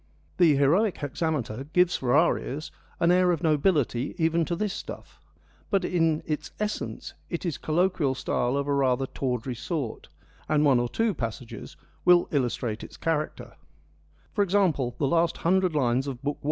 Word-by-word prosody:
The 165 -5 +5
heroic 170 +9 +3
hexameter 140 -4 -3
gives 180 -1 +4
for 125 0 +1
our 165 +3 +4
ears 150 +3 -6 0.3
an 170 0 +4
air 180 0 +4
of 170 0 -2
nobility 150 -5 +1
even 165 -1 +2
to 170 - -2
this 205 +2 -2
stuff, - - -9 0.5
but 195 -3 +1
in 165 -3 +1
its 155 0 -3
essence 210 0 -4 0.2
it 170 +1 -4
is 165 -5 -2
colloquial 160 -4 +1
style 125 0 -1
of 140 0 -1
a 145 - +1
rather 135 -1 +2
tawdry 125 -1 -3
sort, 135 +1 -4 0.4
and 150 0 +3
one 135 -4 +5
or 120 0 -1
two 225 - 0
passages 115 -3 -6 0.3
will 175 -1 +5
illustrate 120 -5 -1
its - - -11
character; 155 -2 -2 0.8
for 205 - +2
example, 175 - +1
the 145 - 0
last 165 +4 +2
hundred 185 -1 +3
lines 130 -1 +1
of 135 -1 -6
Book 145 +1 -2
I. - - -31
150 Hz, 165 wpm, -26 LUFS, 130-175 Hz, 0.8 s, The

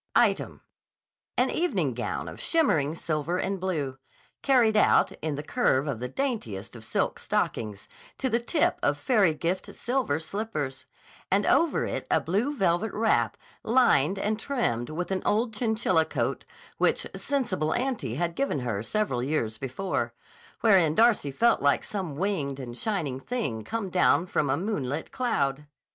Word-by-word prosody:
Item: - - +2 0.8
An - - +3
evening 350 +1 0
gown - - -3
of - - -8
shimmering 160 - +2
silver 160 +1 -2
and 195 +1 -1
blue, 150 -8 -2 0.4
carried 245 -6 +4
out, 210 - +4
in 155 -2 -2
the 145 - -5
curve 150 - +1
of 135 -6 -2
the 125 - -3
daintiest 125 - -3
of 115 - -10
silk - - -1
stockings, 105 -3 -2 0.3
to 265 - -1
the 235 -1 +2
tip 295 +7 +1
of 145 0 +1
fairy 195 - +3
gift 175 +4 -3
silver 245 - 0
slippers; 160 -7 -4 0.4
and - - +2
over 335 -1 +3
it - - -4
a - - +4
blue 220 - -1
velvet 195 -1 +1
wrap 165 - +1 0.2
lined 210 - +3
and 215 +2 -1
trimmed 215 - -1
with 175 +4 -4
an 190 - 0
old 225 +2 +1
chinchilla 215 -7 +2
coat, - - -2 0.3
which - - +2
Sensible 205 - -1
Auntie 240 - -2
had 170 +3 -1
given 220 - -1
her 115 -5 -2
several 135 - -1
years 120 -6 -1
before; 135 +9 -2 0.5
wherein 185 -8 +5
Darcy 225 -9 +4
felt 230 - +2
like 140 0 +3
some 185 -8 -4
winged 150 -6 -1
and 120 -3 -7
shining 155 - -2
thing 135 - -3
come 220 - -4
down 180 -1 +4
from 150 -5 0
a 135 - +2
moonlit 160 - -3
cloud. 145 - -1
175 Hz, 155 wpm, -27 LUFS, 140-225 Hz, 0.8 s, wherein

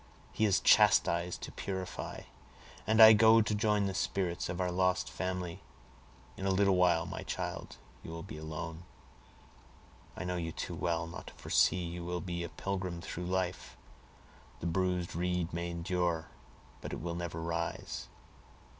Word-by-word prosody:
He 110 - +1
has 100 -3 +3
chastised 85 +1 +4
to - - -6
purify, 95 -1 -5 0.7
and 110 0 +3
I 110 0 +12
go 110 +1 +7
to 110 -1 +1
join 105 -1 +2
the 95 - -1
spirits 95 -2 -1
of 90 - -3
our 90 -1 0
lost 90 +1 +1
family. 90 -2 -3 0.8
In 95 - -2
a - - +2
little 95 0 +3
while, 85 -2 +3
my - - -5
child, - - -5 0.2
you - - -9
will 85 0 -6
be 90 -5 -8
alone. 80 +1 -6 1.4
I - - -4
know 90 0 -2
you 80 -2 -3
too - - -4
well 85 -2 -1
not 85 - -9
to - - -9
foresee 90 - +2
you 85 +1 -5
will 90 +1 -2
be 85 -1 -4
a 85 - -5
pilgrim 95 -3 -3
through 90 +1 -5
life. 95 -1 -2 0.8
The 80 - -7
bruised 90 0 0
reed 90 0 -1
may 85 +1 -2
endure, 85 -1 -1 0.5
but - - -6
it - - -4
will 85 +1 -4
never 85 -1 -4
rise. 85 0 -3
90 Hz, 165 wpm, -32 LUFS, 85-95 Hz, 1.4 s, I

